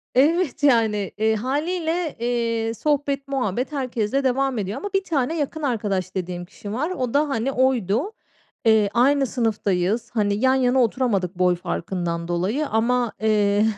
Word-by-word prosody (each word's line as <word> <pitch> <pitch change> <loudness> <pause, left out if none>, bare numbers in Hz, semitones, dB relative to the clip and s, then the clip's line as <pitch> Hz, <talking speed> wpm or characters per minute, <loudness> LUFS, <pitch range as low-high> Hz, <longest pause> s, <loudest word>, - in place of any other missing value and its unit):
Evet, 300 +1 +2
yani, 220 -7 +3
eee, 220 +1 +2
hâliyle, 320 - -1
eee, 230 -1 -1
sohbet 280 0 -1
muhabbet 255 -1 -1
herkesle 260 -2 -1
devam 265 -1 +1
ediyor 200 0 -3
ama 410 - -5
1 390 0 +2
tane 315 -1 -1
yakın 310 +2 -3
arkadaş 200 -8 -1
dediğim 175 -1 -4
kişi 205 +3 -9
var. 295 +8 -1
O 255 -9 -3
da, 290 +1 +2
hani, 265 +1 -1
oydu. 255 - +1 0.5
Eee, 220 -2 +4
aynı 270 +3 +3
sınıftayız. 220 -2 0
Hani, 205 -3 +1
yan 260 +4 +3
yana 260 0 +3
oturamadık 210 -7 0
boy 180 -1 +4
farkından 170 -1 -3
dolayı 195 - -1
ama, 235 +1 +1
eee, 210 -1 +3
240 Hz, 150 wpm, -23 LUFS, 205-275 Hz, 0.5 s, Eee